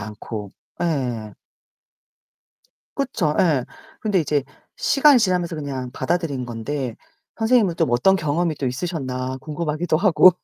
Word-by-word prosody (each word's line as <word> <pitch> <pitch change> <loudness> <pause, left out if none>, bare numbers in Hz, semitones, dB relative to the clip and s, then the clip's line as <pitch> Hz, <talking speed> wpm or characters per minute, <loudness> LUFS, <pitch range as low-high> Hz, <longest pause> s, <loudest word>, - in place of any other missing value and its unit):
않고. 105 -1 -6 0.3
예. 125 - -2 1.6
그쵸. 230 - 0
예. 150 -8 +3 0.4
근데 205 -5 +2
이제 150 -3 0 0.3
시간이 280 -1 +5
지나면서 180 -5 +1
그냥 135 -4 -4
받아들인 165 -7 -1
건데 120 +2 -4 0.4
선생님은 225 -5 +3
좀 165 - +1
어떤 125 +11 +4
경험이 165 0 0
또 140 - -3
있으셨나 130 -2 -3
궁금하기도 155 +3 -1
하고 180 -1 +6
150 Hz, 270 characters per minute, -22 LUFS, 130-180 Hz, 1.6 s, 하고